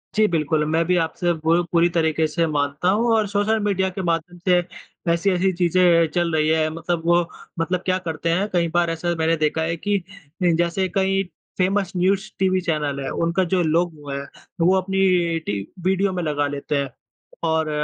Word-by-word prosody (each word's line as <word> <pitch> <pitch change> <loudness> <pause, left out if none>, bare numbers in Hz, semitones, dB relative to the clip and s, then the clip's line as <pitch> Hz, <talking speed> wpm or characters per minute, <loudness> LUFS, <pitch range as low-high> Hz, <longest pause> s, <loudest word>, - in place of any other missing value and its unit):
जी 215 0 +4
बिल्कुल, 155 -3 0
मैं 160 +2 +1
भी 180 - +2
आपसे 170 +1 0
पू 165 +2 +2
पूरी 170 0 +4
तरीक़े 160 -1 +2
से 165 +2 0
मानता 145 +2 0
हूँ 230 +4 +2
और 215 -2 +2
सोशल 205 +2 +1
मीडिया 190 -2 +1
के 185 +1 -5
माध्यम 170 0 -2
से 180 -1 +5 0.5
ऐसी-ऐसी 185 +2 +1
चीज़ 175 0 0 0.4
चल 175 -1 +1
रही 155 0 +2
है 160 -1 +2
मतलब 165 0 -2
वो 170 0 +4 0.4
मतलब 180 +2 0
क्या 185 0 +2
करते 165 0 -2
हैं 185 +5 +1
कई 170 -2 +2
बार 175 -1 +2
ऐसा 165 +1 -1
मैंने 160 +1 +2
देखा 155 +1 0
है 165 +1 -1
कि 205 +4 0 0.5
जैसे 175 +2 +1
कई 195 0 +2 0.3
फ़ेमस 190 0 +1
न्यूज़ 195 +3 +1
टीवी 185 -1 +2
चैनल 150 -5 -1
हैं 135 - -3
उनका 170 +3 +1
जो 180 - +3
लोगो 160 -2 -1
है 140 - -3 0.4
वो 180 +3 +4
अपनी 185 -3 +1
टी 100 -1 -2 0.3
वीडियो 190 +1 +2
में 180 -2 -2
लगा 145 -2 0
लेते 145 +1 -3
हैं 140 -1 -1 0.5
और 160 -1 +1
170 Hz, 185 wpm, -22 LUFS, 160-185 Hz, 0.5 s, से